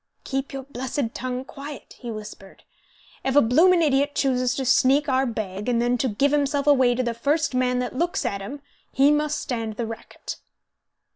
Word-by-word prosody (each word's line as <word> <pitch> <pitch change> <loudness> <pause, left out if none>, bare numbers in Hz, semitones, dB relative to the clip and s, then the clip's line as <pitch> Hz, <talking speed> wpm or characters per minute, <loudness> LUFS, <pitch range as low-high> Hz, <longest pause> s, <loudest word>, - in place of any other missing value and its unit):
"Keep 270 0 -3
your 270 -1 -5
blessed 260 -2 -3
tongue 255 +1 -4
quiet," 280 +1 -9
he 240 - -7
whispered, 210 -3 -9 0.6
"If 265 0 0
a - - +9
bloomin' 335 +9 +5
idiot 285 -1 +2
chooses 255 -2 +1
to 265 - -2
sneak 275 +4 +4
our 265 -1 +2
bag, 210 -2 -4
and 235 -1 +2
then 240 +1 +2
to 265 - +1
give 265 +6 +1
himself 285 -1 +1
away 260 -4 +4
to 255 - 0
the 235 -1 -1
first 290 +6 0
man 250 0 +1
that 250 0 -3
looks 345 +6 -1
at 200 -1 -2
him, 280 +9 -7 0.3
he 275 +2 +4
must 300 0 +1
stand 225 -4 -3
the 235 - -2
racket." 225 0 -8
260 Hz, 190 wpm, -24 LUFS, 240-285 Hz, 0.6 s, a